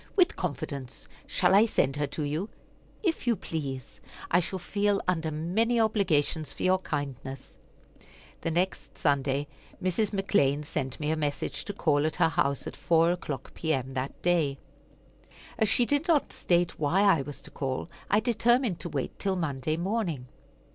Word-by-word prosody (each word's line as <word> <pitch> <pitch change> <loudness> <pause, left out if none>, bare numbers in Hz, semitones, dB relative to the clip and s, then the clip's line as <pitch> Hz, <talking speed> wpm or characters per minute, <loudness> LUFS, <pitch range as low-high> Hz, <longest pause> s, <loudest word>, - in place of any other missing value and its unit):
"With 365 -4 +4
confidence. 135 -4 -5 0.2
Shall - - +3
I 210 +4 +7
send 135 -10 +1
her 145 -1 0
to 150 +2 -4
you?" 155 +8 -2 0.5
"If 330 - 0
you 235 - +4
please. 140 - -5 0.3
I 175 - +6
shall 185 +2 -3
feel 200 +2 +1
under 165 -3 +1
many 190 +10 +1
obligations 170 -9 +1
for - - -6
your 185 0 +4
kindness." 135 - -5 0.8
The - - -1
next 180 +3 -1
Sunday 140 -1 +1 0.3
Mrs. 185 +3 +1
McClean 150 -8 +1
sent 135 -3 -3
me 150 0 0
a - - +2
message 150 -2 -2
to 205 - -4
call 150 -6 +2
at 155 - -3
her - - +4
house 140 -2 0
at - - -6
four 165 0 +3
o'clock 155 -6 -5
P.M., 135 -5 -1
that 130 +1 -3
day. 165 -6 +2 1.0
As 220 -2 +3
she 240 - +4
did 290 +4 +1
not 315 -5 +2
state 175 -1 +1
why 160 +6 +2
I 195 -8 +5
was 145 +1 -7
to - - -12
call, 130 0 -3 0.2
I 205 - +5
determined 240 -3 +2
to 175 - -5
wait 140 -4 -3
till 195 -2 0
Monday 155 -3 -1
morning. 175 - -1
165 Hz, 165 wpm, -28 LUFS, 145-200 Hz, 1.0 s, I